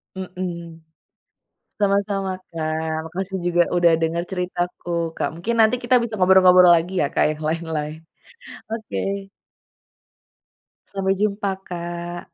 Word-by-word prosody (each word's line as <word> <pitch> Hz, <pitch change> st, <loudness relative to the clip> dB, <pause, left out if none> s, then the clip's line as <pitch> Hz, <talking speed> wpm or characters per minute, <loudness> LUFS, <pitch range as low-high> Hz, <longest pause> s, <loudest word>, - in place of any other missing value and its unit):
Mhm, 180 Hz, -3 st, -6 dB, 1.0 s
sama-sama 200 Hz, -1 st, +1 dB, 0.2 s
Kak, 160 Hz, 0 st, -3 dB
makasih 190 Hz, +3 st, -4 dB
juga 175 Hz, 0 st, +4 dB
udah 175 Hz, -1 st, +5 dB
denger 165 Hz, +1 st, 0 dB
ceritaku 180 Hz, -1 st, -3 dB, 0.3 s
Kak. -, -, 0 dB
Mungkin 215 Hz, +8 st, -2 dB
nanti 220 Hz, +2 st, +5 dB
kita 245 Hz, +1 st, +2 dB
bisa 225 Hz, -2 st, -3 dB
ngobrol-ngobrol 185 Hz, -1 st, +7 dB
lagi 170 Hz, +3 st, -2 dB
ya, 145 Hz, -, +2 dB
Kak, -, -, +3 dB
yang 155 Hz, -, -11 dB
lain-lain, 160 Hz, -1 st, -3 dB, 0.7 s
oke. 220 Hz, -2 st, -4 dB, 1.9 s
Sampai 195 Hz, -1 st, -1 dB
jumpa, 200 Hz, -1 st, -1 dB
Kak. 175 Hz, 0 st, -5 dB
180 Hz, 110 wpm, -22 LUFS, 170-195 Hz, 1.9 s, ngobrol-ngobrol